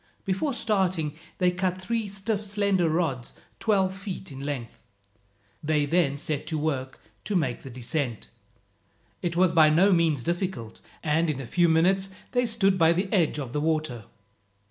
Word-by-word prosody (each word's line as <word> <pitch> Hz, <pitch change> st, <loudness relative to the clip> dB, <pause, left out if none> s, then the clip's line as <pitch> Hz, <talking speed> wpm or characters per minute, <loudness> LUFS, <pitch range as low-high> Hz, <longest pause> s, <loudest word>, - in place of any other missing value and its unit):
Before 195 Hz, +10 st, 0 dB
starting 185 Hz, -, 0 dB, 0.2 s
they 180 Hz, -1 st, +3 dB
cut 185 Hz, 0 st, -1 dB
three 225 Hz, +3 st, -2 dB
stiff 200 Hz, +2 st, -2 dB
slender 200 Hz, -4 st, +1 dB
rods 155 Hz, -7 st, -1 dB, 0.3 s
twelve 195 Hz, -4 st, +2 dB
feet 195 Hz, -2 st, -7 dB
in 135 Hz, -, -8 dB
length. 135 Hz, -5 st, -5 dB, 0.8 s
They 150 Hz, -1 st, +1 dB
then 145 Hz, -2 st, +2 dB
set 145 Hz, 0 st, -3 dB
to 160 Hz, -, -2 dB
work 135 Hz, -4 st, -2 dB, 0.2 s
to 205 Hz, -, -2 dB
make 135 Hz, -9 st, 0 dB
the 135 Hz, -, -9 dB
descent. 125 Hz, -, -3 dB, 0.9 s
It 170 Hz, -1 st, -2 dB
was 180 Hz, 0 st, +4 dB
by 160 Hz, -2 st, +6 dB
no 185 Hz, +6 st, +5 dB
means 160 Hz, -7 st, +2 dB
difficult, 170 Hz, -, -3 dB, 0.2 s
and 160 Hz, +2 st, +2 dB
in 145 Hz, -3 st, -2 dB
a 135 Hz, -, -5 dB
few 175 Hz, +7 st, +2 dB
minutes 190 Hz, +4 st, +3 dB, 0.2 s
they 245 Hz, -1 st, +2 dB
stood 195 Hz, -4 st, +2 dB
by 165 Hz, 0 st, +5 dB
the 185 Hz, +3 st, -2 dB
edge 170 Hz, -7 st, +2 dB
of 130 Hz, -4 st, -5 dB
the 150 Hz, -, 0 dB
water. 155 Hz, -8 st, -1 dB
170 Hz, 165 wpm, -26 LUFS, 150-190 Hz, 0.9 s, by